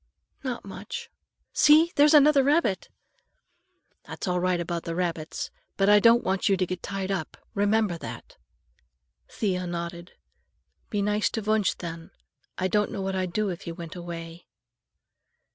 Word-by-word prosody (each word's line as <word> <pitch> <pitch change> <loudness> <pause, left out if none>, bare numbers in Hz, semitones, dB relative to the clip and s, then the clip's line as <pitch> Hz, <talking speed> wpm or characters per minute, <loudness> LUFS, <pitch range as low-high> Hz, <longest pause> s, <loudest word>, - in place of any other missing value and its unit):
"Not 250 -5 -4
much. 475 - -7 0.4
See, 310 +3 +6
there's 295 +2 +6
another 295 -1 +7
rabbit!" 285 - +1 1.2
"That's - - -6
all 180 0 +1
right 180 0 +1
about 170 0 -3
the 165 - -4
rabbits, 165 -3 -3 0.3
but 195 0 +3
I 210 0 +7
don't 230 +3 +5
want 190 +2 0
you 195 - +3
to 185 - +1
get 180 0 -5
tied 195 -1 -3
up. 185 -5 -3 0.2
Remember 205 -3 +1
that." - - -9 0.9
Thea 185 -4 -2
nodded. 170 0 -5 0.8
"Be 205 -1 -1
nice 210 +1 +1
to 225 - -3
Wunsch, 215 -2 +1
then. 165 -1 -7 0.5
I 185 - 0
don't 210 +2 +1
know 195 - -4
what 190 0 -2
I'd 185 -1 -1
do 210 +2 0
if 175 -2 -5
he 170 - -6
went 165 0 -8
away." 170 -1 -8
190 Hz, 155 wpm, -26 LUFS, 175-215 Hz, 1.2 s, another